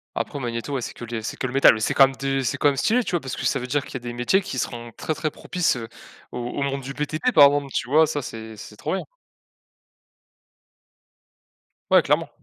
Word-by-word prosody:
Après 145 - -3
Magneto, 120 +1 -4
ouais 135 - -1
c'est - - -5
que 120 - -8
le 115 -1 -4
c'est 110 - -5
que - - -3
le 125 - -4
métal. 135 -5 +6
C'est - - +1
quand 135 - +8
même 135 - -8
de 135 0 -1
c'est 120 -5 -1
quand 145 - +4
même 140 - -2
stylé 240 - +2
tu - - -4
vois? 175 - +1
Parce 135 -4 -6
que - - -5
ça 135 - +1
veut 125 - -5
dire 140 +2 -1
qu'il - - -11
y - - -2
a - - -7
des 120 0 -6
métiers 120 +11 +2
qui 195 +1 -6
seront 120 -1 -4
très 155 - -2
très 155 0 -2
propices, 180 +2 -1
heu, 115 -2 -6 0.4
au - - -5
au 120 +3 -4
monde 140 0 -2
du 135 +1 -7
BTP 155 - -1
par 145 -10 +8
exemple, 140 0 +2
tu 125 - -2
vois? 155 +3 +5
Ça 145 -2 -3
c'est 110 -2 -8
c'est 105 +1 -11
trop - - -3
bien. - - -3 2.9
Ouais - - +7
clairement. - - +1
135 Hz, 250 wpm, -23 LUFS, 120-145 Hz, 2.9 s, quand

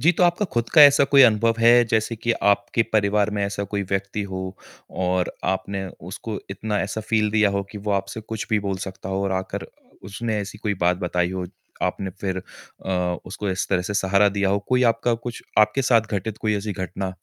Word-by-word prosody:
जी, 165 - +5
तो 180 - 0
आपका 175 +4 +2
खुद 120 0 0
का 155 - +10
ऐसा 140 -1 +7
कोई 140 0 +6
अनुभव 115 -1 +4
है, 120 +1 +6
जैसे 110 +1 0
कि 115 +2 0 0.2
आपके 100 +3 0
परिवार 105 0 +2
में 100 -1 -1
ऐसा 100 0 -3
कोई 100 +1 -3
व्यक्ति 95 +1 -2
हो, 95 0 -5 0.3
और 90 -1 -1
आपने 95 +1 -2 0.2
उसको 105 +2 -5
इतना 105 +2 -2
ऐसा 100 +3 -3
फील 110 0 +1
दिया 110 -1 +3
हो 100 0 -1
कि 105 - -7
वो 105 +1 -4
आपसे 100 +2 -2
कुछ 110 0 -6
भी 110 - +3
बोल 100 -1 -2
सकता 95 0 -8
हो 95 0 -1
और 95 - -1
आकर 95 0 -3 0.4
उसने 105 +3 -3
ऐसी 100 -1 -6
कोई 105 -1 -1
बात 90 +1 +3
बताई 90 0 0
हो, 95 -1 -3 0.4
आपने 95 -1 -1
फिर 95 -2 -2 0.5
अ, 90 -2 0
उसको 100 +2 -5
इस 95 0 -2
तरह 90 -2 +1
से 100 +3 -4
सहारा 100 +1 +3
दिया 100 0 0
हो? 100 +1 +2
कोई 125 0 +3
आपका 115 +1 0
कुछ 120 +1 -7 0.2
आपके 105 +5 +4
साथ 120 -2 +4
घटित 105 +2 -3
कोई 110 -1 0
ऐसी 105 +1 -3
घटना? 95 +1 -4
100 Hz, 210 wpm, -23 LUFS, 95-110 Hz, 0.5 s, का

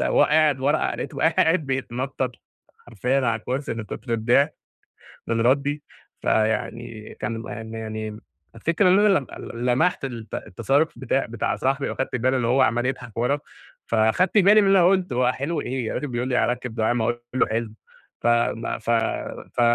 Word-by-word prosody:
وهو - - +3
قاعد 150 -3 +3
ورا 145 +4 +1
لقيته - - -6
بقى 160 - +3
قاعد 160 -2 +3
بيتنطط 130 0 -2 0.6
حرفيًا 125 +4 0
على 115 - 0
الكرسي 135 +1 -3
من 115 -1 -5
كُتر 115 +4 -6
الضحك، 125 +7 +2 0.7
من 115 0 0
ردي، 140 +4 +1 0.4
فيعني 110 0 -1
كان 115 +1 -3
م 115 - -7
م 110 0 -7
يعني 110 -1 -5 0.4
الفكرة 170 - +2
إن 185 +2 +5
أنا 210 - +5
لم 135 - -10
ل 120 +1 -6
لمحت 130 +6 +2
الت 115 -5 -7
التصرُّف 135 - 0
بتاع 135 +2 0
بتاع 115 -2 -2
صاحبي 135 +1 0
وأخدت 130 -1 -3
بالي 130 +2 +1
إن 120 - 0
هو 125 +3 +3
عَمَّال 120 -1 +2
يضحك 125 -4 -4
ورا، 130 +5 +1 0.5
فخدت 115 - +2
بالي 205 +2 +7
من 200 - +2
اللي 195 0 +5
أنا 175 - +6
قُلته، 185 -8 +1
هو 125 0 +3
حلو 150 +6 -3
إيه 125 -3 -3
الراجل 145 - -3
بيقول 125 -1 -2
لي 125 - 0
هاركِّب 125 -2 -1
دعامة 115 0 +1
وأنا 120 +1 0 0.2
أقول 130 - 0
له - - +5
حلو! 110 0 -2 0.5
ف - - 0
م 120 -1 +1
ف 115 - -7 0.7
ف - - +1
125 Hz, 180 wpm, -24 LUFS, 115-140 Hz, 0.7 s, بالي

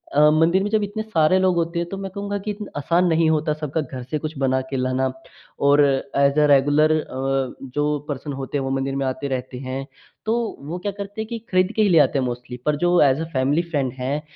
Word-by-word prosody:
अ, 150 +1 +6
मंदिर 165 +5 +3
में 205 - -1
जब 215 0 +1
इतने 205 +2 -3
सारे 185 -4 +3
लोग 185 -1 +2
होते 170 0 -1
हैं, 170 - -2
तो 195 - -5
मैं 195 -1 -5
कहूँगा 200 +1 -3
कि, 210 +2 -4
इतना 205 0 -7
आसान 170 +5 +2
नहीं 165 -1 +3
होता 155 -1 +1
सबका 155 0 -3
घर 130 -2 -7
से 130 +5 -3
कुछ 155 -1 -5
बना 130 -1 +1
के 135 - -1
लाना 130 +1 0 0.6
और 145 +1 +6 0.3
ऐज़ 140 +1 +3
अ 150 - +5
रेगुलर 145 +2 +4
अ, 135 -3 -1 0.2
जो 150 0 +1
पर्सन 145 +1 -4
होते 135 +1 -4
हैं, 135 - -2
वो - - -2
मंदिर 135 0 -1
में 135 0 -1
आते 130 +2 -2
रहते 130 -1 -4
हैं। 135 +1 -4 0.4
तो 220 - +1 0.4
वो 175 - -3
क्या 205 +3 -3
करते 200 +2 -6
हैं 220 - -5
कि 235 0 -4
खरीद 185 +2 +3
के 220 - +2
ही 205 - +4
ले 170 -3 +6
आते 145 - +3
हैं 130 - 0
मोस्टली, 125 0 -5
पर 150 - +2
जो 175 +2 +3
ऐज़ 140 +2 +4
अ - - -1
फ़ैमिली 135 +4 +2
फ्रेंड 140 -6 0
हैं, 140 +4 -1
150 Hz, 245 wpm, -22 LUFS, 135-180 Hz, 0.6 s, अ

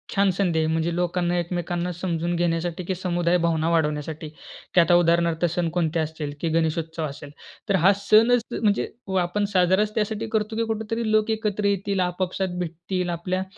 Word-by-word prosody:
छान 200 0 +4
संधी 175 -4 +1
आहे. 155 - +1
म्हणजे 160 +1 0
लोकांना 175 0 0
एकमेकांना 175 0 -2
समजून 175 -1 -2
घेण्यासाठी 170 +1 -1
की 185 +2 -2
समुदाय 175 -1 +1
भावना 165 -1 +1
वाढवण्यासाठी. 155 -1 -1 0.5
की - - +5
आता 170 +1 +3
उदाहरणार्थ 170 -1 +3
सण 175 -1 +1
कोणते 165 -2 +1
असतील 155 -2 -3
की 165 - 0
गणेशोत्सव 160 0 -1
असेल, 145 0 -8 0.4
तर 200 - +3
हा 195 - +7
सणच 220 +4 +4
म्हणजे 210 -3 +1 0.3
आपण 190 +4 0
साजराच 190 +3 +2
त्यासाठी 220 +1 -1
करतो 220 0 -1
की 230 - +1
कुठेतरी 220 +1 -2
लोक 215 0 +3
एकत्र 210 -2 -1
येतील, 200 -1 0
आपापसात 185 +1 -2
भेटतील, 175 +2 -3
आपल्या 185 +2 -2
175 Hz, 165 wpm, -24 LUFS, 165-200 Hz, 0.5 s, हा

